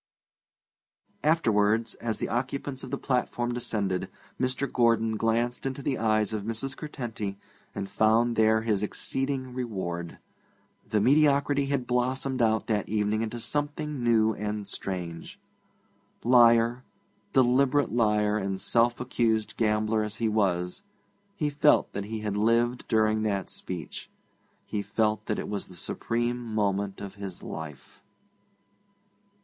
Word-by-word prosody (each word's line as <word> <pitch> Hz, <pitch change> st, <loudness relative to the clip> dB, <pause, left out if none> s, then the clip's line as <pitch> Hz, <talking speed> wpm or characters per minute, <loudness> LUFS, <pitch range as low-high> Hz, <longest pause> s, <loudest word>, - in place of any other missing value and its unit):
Afterwards, 115 Hz, -8 st, +2 dB
as 115 Hz, -2 st, -3 dB
the -, -, -2 dB
occupants 130 Hz, +2 st, -3 dB
of 130 Hz, -, -7 dB
the -, -, -2 dB
platform 120 Hz, -2 st, -1 dB
descended, 100 Hz, -6 st, -1 dB, 0.3 s
Mr. 130 Hz, +2 st, 0 dB
Gordon 115 Hz, -2 st, +2 dB
glanced 115 Hz, +2 st, 0 dB
into 135 Hz, +1 st, -4 dB
the 135 Hz, -, -1 dB
eyes 110 Hz, -1 st, +2 dB
of 105 Hz, -, -2 dB
Mrs. 115 Hz, +6 st, -2 dB
Curtenty, 115 Hz, -9 st, -5 dB, 0.4 s
and 100 Hz, -, -3 dB
found 110 Hz, +4 st, +3 dB
there 110 Hz, 0 st, +3 dB
his 105 Hz, -4 st, +1 dB
exceeding 130 Hz, +4 st, -2 dB
reward. 95 Hz, -9 st, -4 dB, 0.7 s
The 105 Hz, -, +2 dB
mediocrity 140 Hz, +2 st, +3 dB
had 135 Hz, -3 st, -1 dB
blossomed 130 Hz, +1 st, 0 dB
out 110 Hz, -1 st, +2 dB
that 105 Hz, -4 st, -1 dB
evening 105 Hz, +1 st, +1 dB
into 115 Hz, +1 st, -3 dB
something 145 Hz, +1 st, -2 dB
new 110 Hz, -2 st, +3 dB
and 105 Hz, 0 st, -4 dB
strange. 90 Hz, -4 st, -5 dB, 0.8 s
Liar, 120 Hz, 0 st, +5 dB, 0.5 s
deliberate 135 Hz, +2 st, +3 dB
liar 105 Hz, -2 st, +2 dB
and 95 Hz, -1 st, -3 dB
self 120 Hz, +3 st, +3 dB
accused 115 Hz, -3 st, 0 dB
gambler 110 Hz, 0 st, +1 dB
as 105 Hz, 0 st, -3 dB
he 115 Hz, 0 st, 0 dB
was, 95 Hz, -, 0 dB, 0.5 s
he 150 Hz, -6 st, -1 dB
felt 145 Hz, +1 st, +3 dB
that 100 Hz, 0 st, -3 dB
he 110 Hz, +1 st, -5 dB
had 105 Hz, -2 st, -2 dB
lived 115 Hz, +3 st, +1 dB
during 110 Hz, -1 st, +2 dB
that 100 Hz, -4 st, -1 dB
speech; 90 Hz, -4 st, -6 dB, 0.6 s
he 105 Hz, -, -2 dB
felt 105 Hz, +1 st, 0 dB
that 105 Hz, -, 0 dB
it -, -, -4 dB
was 105 Hz, -1 st, -4 dB
the 90 Hz, -, -12 dB
supreme 120 Hz, +7 st, -2 dB
moment 100 Hz, -3 st, -1 dB
of 100 Hz, -1 st, -7 dB
his 95 Hz, -3 st, -6 dB
life. 75 Hz, -3 st, -8 dB
115 Hz, 135 wpm, -27 LUFS, 105-125 Hz, 0.8 s, Liar